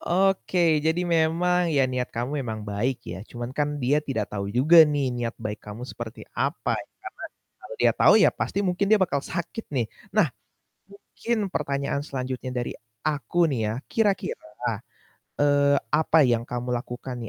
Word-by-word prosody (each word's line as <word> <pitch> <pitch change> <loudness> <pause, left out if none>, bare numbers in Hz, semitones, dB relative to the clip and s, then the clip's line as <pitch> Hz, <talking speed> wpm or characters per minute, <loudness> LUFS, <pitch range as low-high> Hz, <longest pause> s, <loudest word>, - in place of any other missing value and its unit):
Oke, 180 -3 +2
jadi 160 +4 +1
memang, 170 +1 +2
ya, 140 -4 +3
niat 125 -1 -2
kamu 130 +5 -3
emang 110 -4 -5
baik 110 +5 -2
ya, 95 - -7
cuman 120 +3 -7
kan 145 +1 -1
dia 145 +2 +2
tidak 140 -3 -3
tahu 100 -1 -3
juga 145 +10 +6
nih 140 -4 0
niat 120 -1 -3
baik 105 0 -5
kamu 105 +4 -8
seperti 120 -3 -8
apa, - - -1
ya - - -11 0.6
karena - - -52
kalau - - -8
dia - - +4
tahu - - +7
ya - - +6
pasti - - -3
mungkin 185 +2 0
dia 215 - +6
bakal 175 -8 +1
sakit 170 +8 -5
nih. 130 -5 0 0.2
Nah, - - +3 0.6
mungkin 200 +2 -4
pertanyaan 140 -3 -2
selanjutnya 130 -2 -4
dari 125 -1 -3 0.2
aku 155 +4 +1
nih 130 -5 -1
ya, - - -3
kira-kira, 185 - -1 0.7
eee, 145 0 +4 0.2
apa 160 0 +4
yang 120 -1 +1
kamu 125 0 -3
lakukan 120 -1 -5
140 Hz, 165 wpm, -25 LUFS, 125-170 Hz, 0.7 s, tahu